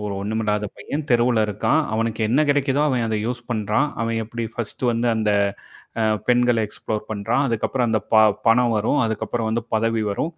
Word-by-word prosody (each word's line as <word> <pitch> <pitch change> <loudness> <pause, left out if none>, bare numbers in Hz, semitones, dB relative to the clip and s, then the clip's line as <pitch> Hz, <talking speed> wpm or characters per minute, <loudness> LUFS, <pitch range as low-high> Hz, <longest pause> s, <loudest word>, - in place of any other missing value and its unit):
ஒரு 105 - -3
ஒண்ணும் 110 +2 -2
இல்லாத 105 0 0
பையன், 150 +2 -4
தெருவுல 120 -1 +3
இருக்கான். 105 0 +1
அவனுக்கு 115 0 -1
என்ன 130 +6 +3
கெடைக்குதோ 140 0 +2
அவன் 125 -3 0
அத 110 -1 -1
யூஸ் 120 0 -3
பண்றான். 110 +6 0
அவன் 115 0 -1
எப்டி 115 +1 -5
ஃபர்ஸ்ட் 120 +2 -5
வந்து 120 +1 0
அந்த 110 -1 +1 0.7
அ - - +2 0.3
பெண்கள 120 -1 +3
எக்ஸ்ப்ளோர் 105 0 -5
பண்றான். 115 +6 0
அதுக்கப்புறம் 120 +1 0
அந்த 110 -1 +2
ப - - +6 0.3
பணம் 115 0 +4
வரும். 110 +7 +1
அதுக்கப்புறம் 110 +1 -2
வந்து 115 0 -1
பதவி 115 0 +1
வரும். 155 +11 -2
115 Hz, 180 wpm, -22 LUFS, 110-120 Hz, 0.7 s, ப